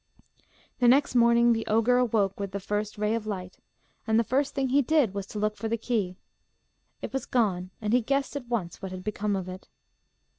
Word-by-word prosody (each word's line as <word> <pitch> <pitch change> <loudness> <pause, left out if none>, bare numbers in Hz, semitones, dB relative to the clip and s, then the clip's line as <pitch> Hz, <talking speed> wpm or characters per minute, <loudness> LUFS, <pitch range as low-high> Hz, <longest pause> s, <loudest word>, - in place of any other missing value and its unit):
The 245 - +4
next 270 +3 +4
morning 235 0 +5
the 225 0 -1
ogre 230 +3 +3
awoke 210 -6 +1
with 200 -1 -4
the 200 - -2
first 210 +2 -3
ray 210 +1 0
of 225 -2 -3
light, 185 -3 -5 0.5
and 220 0 +3
the - - +3
first 275 +5 0
thing 270 -1 0
he 280 +3 +4
did 280 -6 +2
was 200 -1 -4
to - - -8
look 210 0 0
for 225 - -4
the 230 +1 -1
key. 210 -6 -2 0.9
It - - -5
was 270 - -3
gone, 190 -7 0
and 215 0 -1
he 250 - +4
guessed 275 +4 -1
at 265 -4 -5
once 210 -9 -3
what 190 -2 -5
had 185 0 -7
become 210 0 -1
of 190 -2 -4
it. 185 +1 -9
220 Hz, 215 wpm, -27 LUFS, 200-245 Hz, 0.9 s, morning